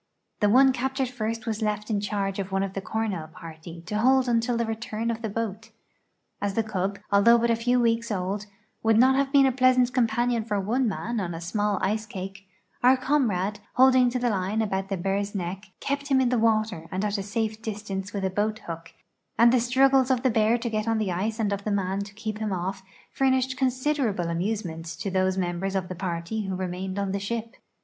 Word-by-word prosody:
The 210 - +3
one 265 +4 +6
captured 265 +1 -1
first 230 -2 -3
was 225 -1 -3
left 210 0 -1
in 205 -2 +1
charge 200 -1 -2
of 195 0 -4
one 195 0 +1
of 195 -1 -4
the 195 - -3
Cornell 210 -6 -3
party 165 0 -11
to 210 +4 -2
hold 260 +2 +4
until 235 0 +1
the 235 - 0
return 225 0 -3
of 225 0 -5
the 220 - -3
boat. 225 0 -4 0.7
As 200 -1 -1
the 225 - +2
cub, 200 -2 -2
although 205 +4 +6
but 235 0 +2
a - - +3
few 245 +2 +1
weeks 230 -1 +1
old, 200 +1 -2 0.3
would 225 -1 +3
not 260 +3 +6
have 275 0 +1
been 275 -1 +6
a 265 - +4
pleasant 255 -1 +3
companion 240 -1 +1
for 210 -2 -1
one 235 +6 +1
man 225 +3 -2
on 175 -4 -3
a - - -5
small 205 +4 -1
ice 215 +3 0
cake, 195 0 -7 0.3
our 255 +2 +6
comrade, 210 -8 0 0.2
holding 255 -1 +6
to 245 - -2
the 245 -1 +1
line 200 +3 0
about 195 -2 -2
the 195 - -1
bear's 200 +3 -2
neck, 190 +2 -4
kept 280 0 -2
him 270 -2 +3
in 255 -2 +3
the 250 -1 +1
water 215 -6 +1
and 190 +2 -1
at 205 0 -1
a - - -1
safe 220 +2 -2
distance 205 -3 -5
with 200 -2 -2
a 190 - 0
boat 210 +3 0
hook, 165 -1 -7 0.4
and 235 +1 +6
the - - +5
strug 260 +3 +3
gles 265 -1 +4
of 255 -1 +1
the 260 - +3
bear 220 +1 +3
to 240 0 -4
get 215 0 -1
on 225 0 +2
the 210 -4 -1
ice 215 +6 -2
and 205 -2 +1
of 200 0 -4
the 215 - -2
man 195 -1 0
to 200 0 -6
keep 215 0 -5
him 215 -2 -2
off 190 +1 -3 0.3
furnished 260 -1 +1
considerable 255 - 0
amusement 170 -2 -2
to 195 +4 -4
those 185 0 +1
members 185 +1 -2
of 185 -2 -1
the 185 - -5
part}' 170 -2 -4
who 210 -4 -2
remained 185 +1 -4
on 200 -1 -1
the 200 - -1
ship. 230 +3 -4
215 Hz, 225 wpm, -26 LUFS, 195-235 Hz, 0.7 s, one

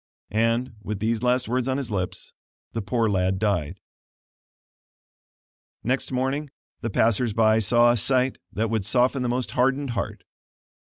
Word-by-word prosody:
And, 115 +3 +1
with 105 +1 -4
these 110 +2 -1
last 125 0 +1
words 125 +2 0
on 130 0 0
his 135 -5 -4
lips, 95 -3 -4 0.4
the 115 - -2
poor 115 +2 0
lad 95 -2 +1
died. 95 -4 -1 2.0
Next 130 +4 -1
morning 135 +3 -1 0.3
the 115 - -3
passers 115 +2 +2
by 110 0 +4
saw 120 +3 +4
a 120 - +1
sight 130 +3 +1
that 110 +1 -1
would 110 -3 0
soften 125 +5 +2
the 125 - 0
most 125 +1 -1
hardened 135 +2 +1
heart. 115 - -4
115 Hz, 150 wpm, -25 LUFS, 110-125 Hz, 2.0 s, by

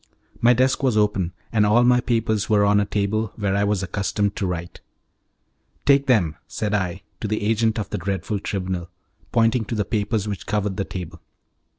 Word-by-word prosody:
My 120 +1 +6
desk 130 +2 +2
was 130 -5 +2
open, 100 -4 +1 0.2
and 110 -2 +4
all 105 +4 +4
my 125 0 +5
papers 115 -4 0
were 105 -2 +4
on 100 0 +4
a 100 - +1
table 105 +1 -1
where 100 -3 -1
I 100 - +2
was 100 -2 0
accustomed 100 +2 -1
to 95 - -1
write. 85 -1 -5 1.0
"Take 140 0 +4
them," 90 - +2
said 105 -1 -3
I, 95 -1 -1 0.2
to 110 - -3
the 110 0 -2
agent 110 +1 +1
of 105 - -4
the - - -2
dreadful 100 +1 -2
Tribunal, 90 -3 -3 0.4
pointing 115 0 +3
to 115 - -4
the 105 -2 0
papers 105 -1 -1
which 100 -3 -5
covered 105 -1 -1
the 100 - -1
table. 90 -3 -7
105 Hz, 190 wpm, -23 LUFS, 100-110 Hz, 1.0 s, My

